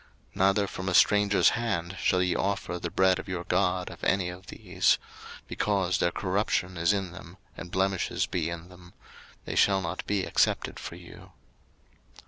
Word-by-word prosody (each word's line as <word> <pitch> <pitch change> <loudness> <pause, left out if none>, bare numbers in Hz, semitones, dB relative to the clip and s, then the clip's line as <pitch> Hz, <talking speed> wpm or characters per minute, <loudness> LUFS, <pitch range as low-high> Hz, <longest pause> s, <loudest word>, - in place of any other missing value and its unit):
03:022:025 - - -30
Neither 100 +2 +3
from 95 0 -5
a - - -1
stranger's 105 +1 +5
hand 95 -6 -2
shall 90 0 +2
ye 90 - 0
offer 100 -2 -2
the 85 - -4
bread 95 +1 +3
of - - -8
your 90 -2 -4
God 90 -1 0
of - - -13
any 95 -2 +1
of 90 +1 -10
these; - - +1 0.5
because 95 -3 0
their 85 - +2
corruption 95 0 -1
is 85 +2 +2
in 95 -3 -2
them, 90 0 -12 0.2
and 90 - -8
blemishes 95 0 0
be 85 -2 -2
in 85 +1 -7
them: 90 -1 -16 0.5
they - - -4
shall 100 -1 +4
not 90 0 -4
be 100 -2 0
accepted - - 0
for - - -7
you. - - -14
95 Hz, 175 wpm, -28 LUFS, 90-100 Hz, 0.5 s, stranger's